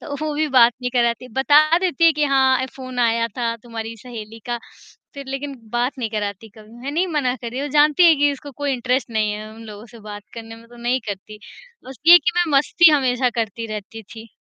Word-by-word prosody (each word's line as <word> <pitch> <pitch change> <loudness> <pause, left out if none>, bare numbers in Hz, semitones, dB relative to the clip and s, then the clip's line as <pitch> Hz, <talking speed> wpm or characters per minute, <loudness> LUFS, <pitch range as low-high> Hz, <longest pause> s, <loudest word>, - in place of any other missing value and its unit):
तो 285 - -7
वो 310 -1 -2
भी 310 +1 0
बात 245 -3 +5
नहीं 250 0 -3
कराती, 240 0 0
बता 300 +5 +4
देती 350 -4 0
है 330 - +6
कि 300 0 0
हाँ, 265 -2 +3
ए - - -2
फ़ोन 255 -1 -8
आया 230 -1 +2
था 235 -2 -1
तुम्हारी 230 -1 -7
सहेली 225 -2 -10
का, 240 0 -2 0.6
फिर 280 -1 -8
लेकिन 275 +1 -5 0.2
बात 240 +3 0
नहीं 230 -4 -3
कराती 210 0 -4
कभी, 215 +1 -17
मैंने 285 +5 -2
ही 375 - +1
मना 290 -7 -1
करी, 245 +3 -6
वो 290 - -3
जानती 300 +4 +5
है 330 - +7
कि 290 0 +3
इसको 285 +1 -8
कोई 285 -1 0
इंटरेस्ट 255 0 -1
नहीं 215 -1 0
है, 210 +1 -7
उन 225 - -12
लोगों 210 +1 -10
से 230 - -12
बात 205 0 -8
करने 225 -1 -9
में 230 0 -17
तो 240 - -16
नहीं 240 +2 -1
करती। 205 +2 -7 0.5
बस 260 0 -11
ये 350 +1 +10
कि 355 - -1
मैं 330 -5 +2
मस्ती 340 +3 +4
हमेशा 255 -3 +1
करती 225 +1 -4
रहती 215 +1 -8
थी। 225 +2 -13
250 Hz, 230 wpm, -21 LUFS, 225-285 Hz, 0.6 s, ये